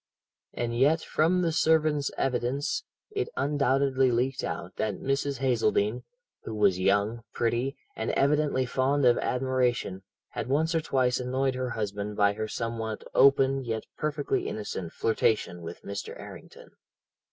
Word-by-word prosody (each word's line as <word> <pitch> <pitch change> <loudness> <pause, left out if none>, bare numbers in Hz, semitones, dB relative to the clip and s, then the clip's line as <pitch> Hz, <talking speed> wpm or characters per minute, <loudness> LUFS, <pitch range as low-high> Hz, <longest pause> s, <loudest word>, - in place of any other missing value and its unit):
"And 115 -1 -2
yet, 145 +6 +3
from 175 +5 +1
the 165 - +1
servant's 155 -3 +2
evidence, 135 - -1 0.3
it 410 +1 -2
undoubtedly 135 -2 +2
leaked 130 +3 0
out 90 +2 -5
that 110 -2 -1
Mrs. 135 +2 -1
Hazeldene, 115 -3 +1 0.4
who 110 - -6
was 100 -4 +3
young, 100 +4 +1
pretty, 120 +3 0 0.2
and 110 - -3
evidently 140 -2 +2
fond 135 +2 +1
of 120 -1 +5
admiration, 125 -6 0 0.3
had - - -5
once 155 +5 +1
or 165 - +2
twice 130 -4 +1
annoyed 130 +1 0
her 130 0 -2
husband 105 -2 -4
by 100 0 +4
her 110 +1 -3
somewhat 115 -1 -4
open, 135 0 +4
yet 115 -2 -3
perfectly 150 -1 -1
innocent, 95 -5 -4
flirtation 110 -5 0
with 85 +1 -8
Mr. 100 0 -6
Errington. - - -12
125 Hz, 140 wpm, -28 LUFS, 110-140 Hz, 0.4 s, of